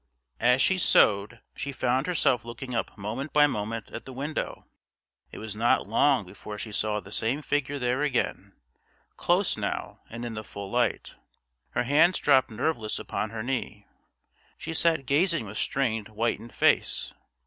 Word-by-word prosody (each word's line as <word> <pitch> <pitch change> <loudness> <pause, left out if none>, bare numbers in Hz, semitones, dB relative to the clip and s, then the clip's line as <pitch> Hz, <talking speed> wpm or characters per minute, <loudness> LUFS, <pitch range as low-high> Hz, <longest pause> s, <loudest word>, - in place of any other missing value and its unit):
As 125 +3 +4
she 190 -1 +3
sewed 105 - +3
she 140 - -4
found 130 +2 0
herself 135 -9 +2
looking 120 +2 -7
up 115 - -2
moment 115 +9 -4
by 150 0 +7
moment 115 -4 -3
at - - -6
the 130 - -8
window. 145 +4 -4 0.7
It - - -9
was 110 -1 -5
not 115 +2 +2
long - - +3
before 105 0 -9
she 110 +1 -6
saw 105 0 0
the 100 - -13
same 120 +8 -1
figure 145 -1 -1
there 125 +1 0
again, 145 -4 -1 0.6
close - - +1
now, - - -3
and 120 +1 -6
in 120 - -4
the 110 0 -5
full 100 -2 -8
light. 120 -3 0 0.6
Her - - +1
hands 155 +8 +4
dropped 135 -3 +4
nerveless 115 -1 -2
upon 110 - -3
her 110 0 -5
knee; 115 -5 -3 0.7
she 165 - -5
sat 160 -4 +2
gazing 165 0 +2
with 105 +1 -6
strained 115 -6 0
whitened 115 +1 -2
face. - - +2
120 Hz, 160 wpm, -27 LUFS, 110-140 Hz, 0.7 s, by